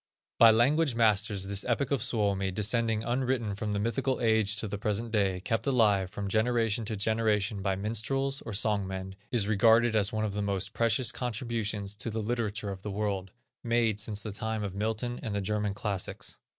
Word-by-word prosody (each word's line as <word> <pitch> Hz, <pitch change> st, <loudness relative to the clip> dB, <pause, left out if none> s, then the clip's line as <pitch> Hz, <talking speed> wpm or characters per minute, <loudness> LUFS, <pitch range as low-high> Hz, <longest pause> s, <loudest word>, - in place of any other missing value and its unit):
By 115 Hz, -, +9 dB
language 135 Hz, +5 st, +3 dB
masters 105 Hz, -3 st, +2 dB
this 100 Hz, 0 st, -1 dB
epic 125 Hz, +3 st, 0 dB
of 140 Hz, -, +1 dB
Suomi, 100 Hz, -4 st, 0 dB
descending 110 Hz, +3 st, +1 dB
unwritten 120 Hz, -3 st, -1 dB
from 105 Hz, +2 st, -3 dB
the 105 Hz, -, -1 dB
mythical 130 Hz, +5 st, -1 dB
age 110 Hz, -2 st, +2 dB
to 110 Hz, -, -2 dB
the 100 Hz, 0 st, -5 dB
present 110 Hz, +2 st, -2 dB
day, 95 Hz, -4 st, +1 dB
kept 115 Hz, +5 st, -2 dB
alive 105 Hz, -8 st, +3 dB
from 100 Hz, 0 st, -5 dB
generation 115 Hz, +1 st, +1 dB
to 110 Hz, 0 st, -3 dB
generation 105 Hz, -1 st, 0 dB
by 95 Hz, -1 st, 0 dB
minstrels, 125 Hz, +7 st, -1 dB
or 115 Hz, -, -7 dB
song 100 Hz, -1 st, +2 dB
men, 95 Hz, 0 st, -5 dB, 0.2 s
is 115 Hz, -5 st, +1 dB
regarded 110 Hz, +2 st, +4 dB
as 105 Hz, -2 st, +2 dB
one 110 Hz, 0 st, -1 dB
of 105 Hz, -, -3 dB
the 105 Hz, -, -2 dB
most 100 Hz, 0 st, -2 dB
precious 115 Hz, +1 st, +1 dB
contributions 110 Hz, -4 st, -3 dB
to 115 Hz, -, -4 dB
the 110 Hz, 0 st, -3 dB
literature 110 Hz, -3 st, -2 dB
of 95 Hz, -1 st, -7 dB
the 105 Hz, -, -5 dB
world, 100 Hz, -2 st, -2 dB, 0.3 s
made 115 Hz, -3 st, +1 dB
since 105 Hz, 0 st, -2 dB
the 110 Hz, -, -4 dB
time 110 Hz, +1 st, -3 dB
of 100 Hz, -2 st, -4 dB
Milton 110 Hz, +4 st, -2 dB
and 105 Hz, -2 st, -4 dB
the -, -, 0 dB
German 105 Hz, 0 st, -1 dB
classics. 100 Hz, -2 st, -4 dB
110 Hz, 190 wpm, -29 LUFS, 100-115 Hz, 0.3 s, By